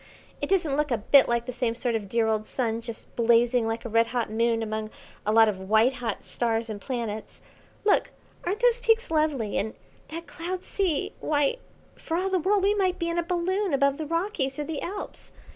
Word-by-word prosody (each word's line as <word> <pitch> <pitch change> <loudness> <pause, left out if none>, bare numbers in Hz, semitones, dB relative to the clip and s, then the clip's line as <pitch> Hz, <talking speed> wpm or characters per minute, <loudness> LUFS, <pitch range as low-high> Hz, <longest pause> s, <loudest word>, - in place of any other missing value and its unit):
It - - -2
doesn't 345 -8 +2
look 300 0 +1
a 240 - +1
bit 265 +6 +5
like 235 0 +1
the 250 - -5
same 240 -2 -1
sort 245 0 -1
of 210 -3 -3
dear 230 +2 +2
old 215 -1 0
Sun 230 -3 -1
just 230 -1 -9
blazing 235 0 +3
like 225 +1 -3
a - - -1
red 230 +1 +3
hot 235 -2 -2
Moon 230 0 +1
among 215 0 -3 0.4
a - - +3
lot 225 0 +6
of 200 -3 -1
white 220 +4 +5
hot 240 -2 -4
stars 230 -1 -1
and 205 -1 -6
planets. 230 -4 -4 0.5
Look, 415 - +3 0.3
aren't 390 +6 -2
those 485 0 +4
peaks 455 -1 +2
lovely, 300 -9 +1
and 220 +1 -3 0.3
that 330 +2 -7
cloud 360 +2 -5
sea? 365 -7 -1
why, 290 - +1 0.4
for 330 - -3
all 380 +2 -1
the 375 - +2
world 390 +3 +2
we 400 +1 +4
might 375 -3 +1
be 335 - -2
in 335 0 0
a - - 0
balloon 360 0 0
above 280 0 +2
the 310 - -4
Rockies 330 -5 -1
or 300 - -2
the 305 -1 -4
Alps. 400 +3 -6
265 Hz, 210 wpm, -26 LUFS, 230-345 Hz, 0.5 s, lot